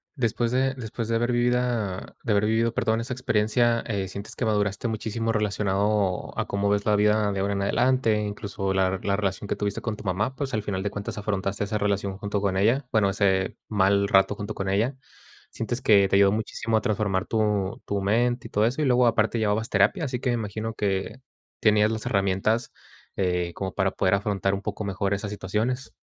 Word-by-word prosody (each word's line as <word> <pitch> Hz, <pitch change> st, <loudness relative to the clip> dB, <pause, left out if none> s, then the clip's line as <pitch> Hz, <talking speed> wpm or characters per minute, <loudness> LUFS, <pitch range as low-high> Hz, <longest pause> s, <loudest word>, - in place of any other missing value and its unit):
Después 120 Hz, -2 st, 0 dB
de 130 Hz, +1 st, +1 dB
después 115 Hz, -2 st, -5 dB
de 115 Hz, -, +2 dB
haber 120 Hz, +1 st, 0 dB
vivido 120 Hz, -5 st, 0 dB
de 115 Hz, -, -1 dB
haber 105 Hz, 0 st, +3 dB
vivido, 115 Hz, +2 st, +1 dB
perdón, 115 Hz, -2 st, +1 dB
esa 125 Hz, +2 st, -4 dB
experiencia, 115 Hz, -1 st, +1 dB
eh, 100 Hz, -3 st, -2 dB
¿sientes 100 Hz, +2 st, -7 dB
que 125 Hz, -, -1 dB
maduraste 105 Hz, +1 st, 0 dB
muchísimo 115 Hz, 0 st, -2 dB
relacionado 105 Hz, -2 st, 0 dB
a -, -, 0 dB
cómo 100 Hz, 0 st, 0 dB
ves 100 Hz, 0 st, +1 dB
la 105 Hz, -, +3 dB
vida 105 Hz, 0 st, +3 dB
de 95 Hz, -, -2 dB
ahora 100 Hz, +1 st, 0 dB
en 100 Hz, -, -1 dB
adelante, 120 Hz, +1 st, +2 dB
incluso, 100 Hz, -2 st, -3 dB
la 95 Hz, 0 st, +1 dB
la 100 Hz, -1 st, +1 dB
relación 100 Hz, 0 st, -2 dB
que -, -, -1 dB
tuviste 100 Hz, -1 st, -2 dB
con 110 Hz, -2 st, -3 dB
tu -, -, -11 dB
mamá? 100 Hz, +8 st, -1 dB
Pues, 140 Hz, -2 st, -3 dB
al 110 Hz, -, -1 dB
final 95 Hz, -2 st, -3 dB
de 100 Hz, -, -1 dB
cuentas 100 Hz, +1 st, -6 dB
afrontaste 100 Hz, -1 st, -2 dB
esa 105 Hz, +1 st, -2 dB
relación 100 Hz, -1 st, -1 dB
junto 105 Hz, 0 st, -2 dB
con 100 Hz, -1 st, 0 dB
ella. 120 Hz, +7 st, +2 dB
Bueno, 105 Hz, -3 st, +3 dB
ese 95 Hz, -1 st, +1 dB
mal 100 Hz, -1 st, +2 dB
rato 95 Hz, +1 st, +4 dB
junto 100 Hz, -1 st, -5 dB
con 95 Hz, 0 st, -3 dB
ella. 110 Hz, +8 st, +1 dB, 0.5 s
Sientes 120 Hz, +2 st, -4 dB
que 100 Hz, -5 st, +5 dB
te 95 Hz, -, +1 dB
ayudó 100 Hz, 0 st, +6 dB
muchísimo 110 Hz, +1 st, -1 dB
a -, -, 0 dB
transformar 105 Hz, -5 st, 0 dB
tu 105 Hz, -2 st, 0 dB
tu 100 Hz, -1 st, -1 dB
mente 120 Hz, +5 st, +1 dB
y -, -, -17 dB
todo 105 Hz, +1 st, +2 dB
eso. 125 Hz, +6 st, 0 dB
Y 150 Hz, -, +2 dB
luego 125 Hz, -1 st, +4 dB
aparte 115 Hz, 0 st, +2 dB
llevabas 110 Hz, +1 st, 0 dB
terapia, 130 Hz, -, +2 dB
así 125 Hz, -3 st, -3 dB
que 130 Hz, -, 0 dB
me 120 Hz, -, +2 dB
imagino 110 Hz, 0 st, -4 dB
que 100 Hz, +2 st, -2 dB, 0.4 s
tenías 105 Hz, 0 st, +4 dB
las 110 Hz, 0 st, -4 dB
herramientas, 100 Hz, +4 st, 0 dB, 0.5 s
eh, 90 Hz, -2 st, 0 dB
como 95 Hz, -1 st, -4 dB
para 95 Hz, -1 st, +1 dB
poder 95 Hz, 0 st, +1 dB
afrontar 100 Hz, -1 st, 0 dB
un 100 Hz, -, -2 dB
poco 105 Hz, 0 st, -4 dB
mejor 100 Hz, 0 st, -1 dB
esas 100 Hz, +1 st, -3 dB
situaciones. 110 Hz, +6 st, -2 dB
105 Hz, 205 wpm, -25 LUFS, 100-115 Hz, 0.5 s, ayudó